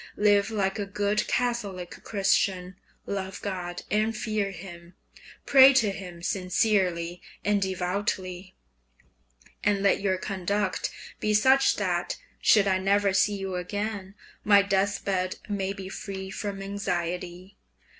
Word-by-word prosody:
Live 205 -1 +4
like 200 -2 -1
a 200 - -2
good 205 +1 0
Catholic 210 -8 -2
Christian; 195 -2 +1 0.3
love 190 -1 -4
God 180 -3 -4
and 215 +1 +1
fear 215 -2 -1
Him; 175 -1 -11 0.5
pray 270 0 +8
to 220 -6 +3
Him 180 -3 -9
sincerely 180 -2 0 0.2
and 205 0 +2
devoutly, 185 0 -2 1.1
and 200 -1 +2
let 200 - +3
your 190 -2 +1
conduct 195 +1 -2 0.3
be 210 0 +1
such 265 +5 +5
that - - -1 0.2
should 205 -2 +5
I 190 -1 +2
never 200 +1 +2
see 205 +1 +2
you 195 -1 -4
again, 200 +1 -4 0.3
my 200 -1 +6
death 200 0 0
bed 185 -2 0
may 195 -2 -2
be 195 -1 -7
free 190 0 -6
from 195 0 -4
anxiety. 180 -2 -4
195 Hz, 125 wpm, -27 LUFS, 185-205 Hz, 1.1 s, pray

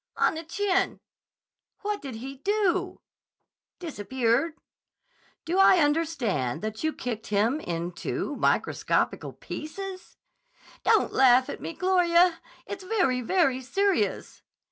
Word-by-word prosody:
"On - - +3
the 320 +1 -6
chin." 385 +3 0 0.8
"What 415 0 -2
did 270 -4 -7
he 265 +4 -7
do?" 375 +1 0 0.8
"Disappeared." 260 - -1 0.9
"Do 355 +4 0
I 385 -1 +7
understand 290 - 0
that 220 +3 -4
you 315 - +1
kicked 235 -6 -5
him 215 +8 +1
into 175 - -4
microscopical - - 0
pieces?" 375 +4 -8 0.7
"Don't - - +3
laugh 255 -1 +5
at - - -8
me, - - -5
Gloria. 355 -1 +3 0.2
It's 390 -1 -7
very, 365 - +1
very 265 -1 +1
serious." 395 +9 -1
320 Hz, 110 wpm, -27 LUFS, 250-375 Hz, 0.9 s, I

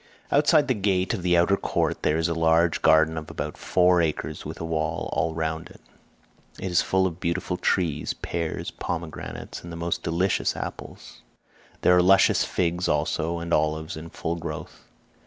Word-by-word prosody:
Outside 145 0 +4
the 130 - +2
gate 95 -3 0
of 105 - -3
the 90 0 +3
outer 85 +3 +4
court - - -1
there 75 - +1
is 80 0 +1
a 85 - -1
large 80 0 +2
garden 80 0 +4
of 80 - -11
about - - -5
four 90 -1 +3
acres 80 -3 -2
with - - -7
a 85 - -4
wall 80 0 -2
all 80 0 0
round 80 +1 -3
it. - - -16 0.8
It 95 - -4
is 85 - +4
full 95 0 +1
of 90 -2 -3
beautiful 90 +1 -2
trees—pears, 85 -1 -2
pomegranates, 85 -3 -6
and 85 - -8
the 85 - -6
most 85 0 -2
delicious 90 +4 0
apples. - - -8 0.6
There 90 - +5
are 90 - +5
luscious 95 +2 +5
figs 90 0 -1
also, 80 +3 0
and 85 0 -3
olives 80 +1 0
in 80 +1 -8
full 85 +1 -3
growth. 85 0 -7
85 Hz, 175 wpm, -25 LUFS, 80-90 Hz, 0.8 s, There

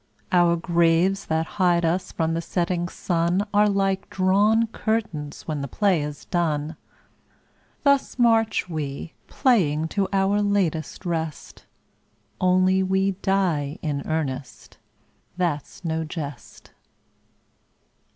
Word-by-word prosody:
Our 175 -1 +4
graves 170 +2 +2
that 160 0 0 0.2
hide 175 -2 +3
us 175 +3 -1
from 165 -1 -1
the 165 - -1
setting 175 0 -1
sun 175 +3 0
Are 210 0 +4
like 195 -1 0
drawn 205 +4 +3
curtains 215 -10 -3
when 150 -3 -2
the 140 - -3
play 190 - +1
is 145 0 -6
done. 160 -3 -1 1.1
Thus 280 -2 +2
march 225 -4 +3
we, 155 -2 -5
playing, 160 - +2
to 195 +1 0
our 195 +1 +2
latest 190 -5 -1
rest, 160 -3 -4 0.7
Only 185 +1 +3
we 190 +1 +1
die 170 -7 0
in 145 -3 -2
earnest, 145 -5 -4 0.6
that's 170 -1 -3
no 160 0 -1
jest. 150 -5 -8
175 Hz, 110 wpm, -24 LUFS, 160-195 Hz, 1.1 s, Our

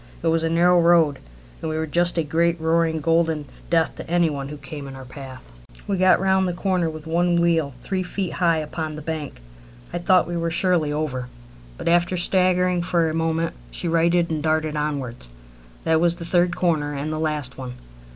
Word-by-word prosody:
It 165 - +2
was 165 0 +1
a 165 - +1
narrow 175 +1 +4
road, 165 -5 +4 0.4
and 160 - -3
we 155 - -2
were 160 - -1
just 175 +3 +1
a 165 - +2
great, 170 +3 +1
roaring, 160 0 +1
golden 165 -1 +1 0.2
death 165 -1 +2
to - - -8
any 170 -2 +2
one 140 -1 -5
who 150 - -7
came 140 0 -8
in 135 - -8
our 135 -1 -9
path. 130 - -11 0.3
We 200 - -1
got 185 0 +5
round 190 0 +2
the 180 - -1
corner 180 -2 0
with 155 -1 -9
one 175 +2 +1
wheel 165 -5 +1
three 190 -1 -2
feet 185 0 -3
high 170 -3 +2
upon 155 0 -4
the 150 - -8
bank. 155 - -5 0.5
I - - -1
thought 185 +1 +3
we 175 0 -3
were 165 0 -1
surely 165 -3 +1
over, 145 -5 -2 0.5
but - - -6
after 175 +2 +2
staggering 180 0 +2
for 170 -2 +1
a - - -5
moment 165 0 0 0.2
she 175 - -4
righted 170 +1 +2
and 155 -1 -1
darted 155 0 0
onwards. 140 - -3 0.5
That 160 0 +2
was 170 0 +3
the 170 -1 -7
third 175 +1 +2
corner 150 -5 0
and 150 +3 -3
the 155 - -3
last 150 -5 -2
one. 125 -1 -6
165 Hz, 205 wpm, -23 LUFS, 150-175 Hz, 0.5 s, got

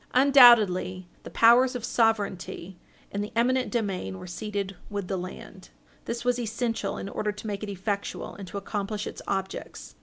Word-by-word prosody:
Undoubtedly 235 -9 +6
the - - -9
powers 245 +3 +5
of 240 -2 -3
sovereignty 200 -5 -1 0.4
and 200 +1 -2
the 210 - -7
eminent 255 +2 +2
domain 195 - -2
were - - -9
ceded 200 +1 -4
with 200 -3 -4
the 195 - -2
land. 185 +1 -8 0.4
This 235 +1 -4
was 245 0 +2
essential 225 -2 -2
in - - -5
order 210 +1 -2
to 210 +2 -11
make 205 -2 -4
it 210 - -5
effectual 200 +1 -4
and 195 -2 -9
to 180 - -6
accomplish 205 +1 -3
its - - -7
objects. 195 -1 -4
205 Hz, 170 wpm, -27 LUFS, 195-235 Hz, 0.4 s, Undoubtedly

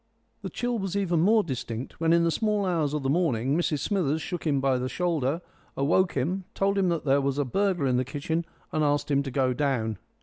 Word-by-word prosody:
The - - -5
chill 240 -1 -2
was 195 -1 -3
even 175 -4 +1
more 210 +6 +4
distinct 125 - -5
when 165 0 +2
in 170 0 +4
the 165 - +2
small 210 +1 0
hours 160 -5 0
of 150 - -2
the - - 0
morning 140 -6 +1
Mrs 155 -4 0
Smithers 160 -6 0
shook 175 0 -4
him 140 -2 +2
by 135 -1 +1
the 130 +1 -2
shoulder, 165 -3 0 0.4
awoke 165 +6 +2
him, 175 +9 -1
told 195 0 +1
him 185 -2 +2
that 170 -3 -1
there 140 0 +3
was 140 0 -1
a 145 - +1
burglar 185 +2 0
in 125 -2 +2
the 130 - +2
kitchen, 150 +5 -2 0.3
and 155 - 0
asked 145 0 +1
him 140 0 +3
to 140 - -4
go 130 -1 +1
down. 120 -7 -1
150 Hz, 230 wpm, -27 LUFS, 135-180 Hz, 0.4 s, more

